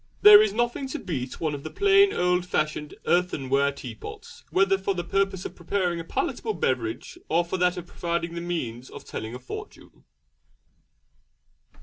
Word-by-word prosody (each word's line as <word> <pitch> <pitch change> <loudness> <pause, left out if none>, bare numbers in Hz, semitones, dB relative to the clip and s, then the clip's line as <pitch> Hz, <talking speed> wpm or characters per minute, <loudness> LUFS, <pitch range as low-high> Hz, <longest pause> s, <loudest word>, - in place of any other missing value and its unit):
There 210 0 +11
is 215 -1 +2
nothing 240 +5 -1
to 265 - -4
beat 135 - -5
one 155 -2 -1
of 145 - -5
the 155 - -6
plain 400 - +5
old 180 - +1
fashioned 155 -3 -2
earthenware 140 -6 +2
teapots, 130 -5 -10
whether 195 +1 +3
for 195 0 -1
the 175 - -2
purpose 195 +1 0
of - - -5
preparing 175 -1 -1
a - - -4
palatable 220 +4 -2
beverage 125 -6 -2
or 170 +2 +2
for 180 +2 -3
that 180 0 +2
of 175 - -6
providing 170 -1 -3
the 170 - -4
means 130 -9 -4
of - - -11
telling 110 +2 -6
a - - -7
fortune. 125 - -10
175 Hz, 165 wpm, -26 LUFS, 140-195 Hz, -, There